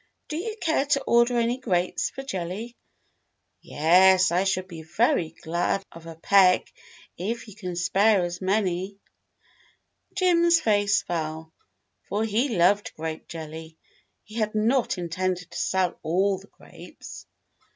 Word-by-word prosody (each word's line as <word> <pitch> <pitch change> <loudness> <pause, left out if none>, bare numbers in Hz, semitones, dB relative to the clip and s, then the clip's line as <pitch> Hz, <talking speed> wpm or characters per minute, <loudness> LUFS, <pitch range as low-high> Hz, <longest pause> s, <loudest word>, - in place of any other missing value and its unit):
"Do 305 - -4
you 430 +6 -4
care 315 -4 0
to 280 -1 +1
order 235 +1 +3
any 235 +2 0
grapes 180 -7 -1
for 270 - -8
jelly 190 -1 -5
.^" 240 - -26 0.9
"Yes, 185 +4 +4
I 180 +3 +1
should 185 -1 -1
be 170 -4 -9
very 175 - +1
glad 175 +4 -1
of 165 0 -12
a 165 - -8
peck, 185 +2 +3 0.5
if 230 +6 -4
you 210 - -11
can 185 -5 -6
spare 195 +3 +3
as 175 +1 -6
many." 190 0 -1 1.2
Jim's 340 -2 +4
face 205 -5 +2
fell, 160 -1 -4 0.6
for 210 +2 0
he 225 +6 0
loved 195 +4 +2
grape 160 0 -6
jelly. 160 0 -9 0.5
He 215 - -16
had 215 -1 -1
not 230 +2 +1
intended 180 +1 -3
to - - -7
sell 185 -2 0
all 190 +4 +1
the 195 - -17
grapes. - - -13
190 Hz, 140 wpm, -25 LUFS, 175-225 Hz, 1.2 s, Yes